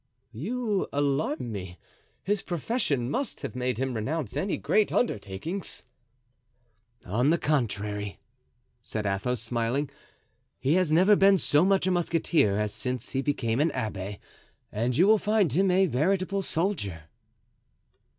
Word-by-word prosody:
"You 210 - -1
alarm 140 -3 0
me; 95 -4 -6 0.5
his 205 +1 0
profession 160 - -1
must 275 +2 -2
have - - -5
made 125 -2 -1
him 130 +1 -1
renounce 130 +3 -3
any 185 +7 -1
great 215 -1 +2
undertakings." 160 - -2 1.2
"On 120 +9 +1
the 170 - +4
contrary," 105 - -1 0.6
said 110 -1 -4
Athos, 100 +5 -1
smiling, 120 +5 -1 0.7
"he 135 +4 +1
has 180 -3 +2
never 185 +6 +6
been 195 0 +5
so 150 -2 +3
much 195 -1 +3
a 185 - +2
musketeer 165 - +2
as 105 -1 -1
since 125 -2 -3
he 135 - 0
became 125 -5 -1
an 155 +3 +3
abbé, 100 -2 -4 0.5
and 120 +4 -1
you 175 - +6
will 215 +1 +5
find 210 - +2
him 190 +5 +3
a 190 +1 +4
veritable 185 +6 0
soldier." 160 - -2
145 Hz, 135 wpm, -27 LUFS, 115-185 Hz, 1.2 s, never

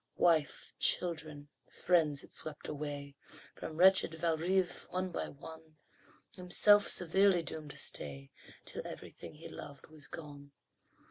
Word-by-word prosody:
Wife, 160 -4 +1
children, 155 -4 +1 0.2
friends, 160 -5 +1
it - - -15
swept 155 -2 -5
away 145 -1 -5 0.4
From 155 - -8
wretched 185 -2 +5
Valrive, 170 +3 0
one 185 0 -3
by - - -3
one, 160 +2 -12 0.6
Himself 205 +3 +4
severely 185 0 +4
doomed 155 -2 -5
to - - -9
stay 70 -1 -3 0.3
Till - - -5
everything - - -10
he 160 - -10
loved 140 -1 -10
was 155 -2 -11
gone. 145 -3 -10
160 Hz, 125 wpm, -33 LUFS, 145-175 Hz, 0.6 s, wretched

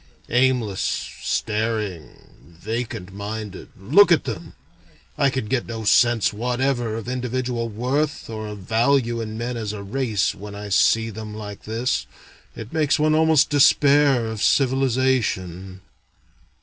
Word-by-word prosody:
Aimless, 125 -5 +1 0.4
staring, 105 -7 -4
vacant 110 -2 -5
minded, 105 -1 -6
look 160 - +5
at 170 - +4
them! 105 -10 -6 0.6
I 140 - +3
can 130 -3 -3
get 120 +3 -1
no 115 -1 -5
sense 120 +1 +3
whatever 120 0 -1
of 115 0 -6
individual 125 -1 -2
worth, 130 +7 -2
or 110 -1 -6
of 105 0 -7
value 115 +4 +1
in 110 -1 -5
men 120 +1 -3
as 110 -2 -4
a 100 -1 -7
race, 110 -2 -1
when 100 +1 -9
I 105 0 -7
see 115 +3 +3
them 105 0 -8
like 105 -2 -8
this. 115 +4 -1 0.5
It 110 0 -9
makes 155 -3 +2
one 155 0 +2
almost 155 -2 +4
despair 140 -3 +4
of 110 -2 -5
civilization." 125 - 0
115 Hz, 135 wpm, -22 LUFS, 105-130 Hz, 0.6 s, look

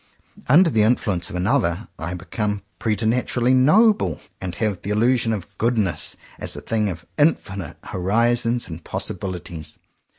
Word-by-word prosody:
Under 165 +5 +6
the 110 - +3
influence 105 -6 +1
of - - -7
another, 90 +1 +1
I 85 +3 -3
become 105 +3 -3 0.2
preternaturally 120 +3 +1
*'noble," 150 - +4 0.2
and 90 -2 -4
have 105 -3 -1
the 100 - -5
il 105 - +1
lusion 120 0 +3
of 100 -5 -3
''goodness" 110 -8 0 0.2
as - - -3
a - - -7
thing 110 -2 0
of 85 -2 -7
infinite 100 - +1
horizons 115 +5 +1
and 80 0 -8
possibilities. 85 -4 -5
105 Hz, 140 wpm, -22 LUFS, 90-120 Hz, 0.2 s, Under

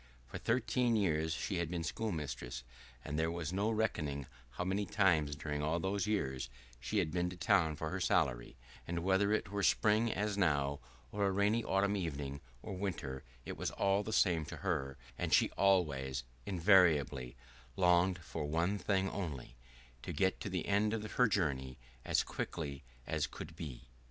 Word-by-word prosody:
For - - -7
thirteen 125 -1 +1
years 80 -6 +1
she 90 +4 -2
had 85 -2 -1
been 85 -1 -2
schoolmistress, 75 - -3 0.4
and 75 +2 -2
there 80 +1 +2
was 85 0 -3
no 100 +3 +1
reckoning 75 -11 -1 0.2
how 65 - -4
many 95 +3 0
times 85 -8 +3
during 75 0 -3
all 80 +3 0
those 95 +2 -1
years 65 - -1 0.3
she 65 - -2
had 85 -6 +1
been 90 +1 0
to 90 - -7
the - - -18
town 85 -3 +3
for 80 +1 -4
her 95 - -2
salary; 70 -10 +1 0.3
and 85 0 -2
whether 95 +2 +3
it 110 -2 0
were 100 0 -1
spring 110 +3 +3
as 105 0 -1
now, 70 -5 +2 0.3
or 100 -1 +1
a - - +1
rainy 105 +4 +2
autumn 100 +1 +2
evening, 70 -6 -3 0.2
or 105 - -5
winter, 80 -9 -4 0.2
it - - -5
was - - -1
all 100 +1 +2
the 105 - -5
same 90 -7 +3
to - - -7
her, 70 -8 -1 0.2
and - - +3
she - - +3
always 70 -10 +2 0.2
invariably 80 -9 +4 0.4
longed 90 0 +4
for 80 -2 -4
one 85 +7 0
thing 95 0 +1
only, 75 -11 -5 0.5
to - - -5
get 95 -1 +1
to - - -4
the 90 -3 -2
end 105 +2 +2
of 110 -1 -5
her 125 - +4
journey 65 - -1 0.3
as - - +2
quickly 70 -5 -4 0.2
as - - 0
could 80 +1 -9
be. 75 -7 -7
85 Hz, 175 wpm, -35 LUFS, 75-100 Hz, 0.5 s, invariably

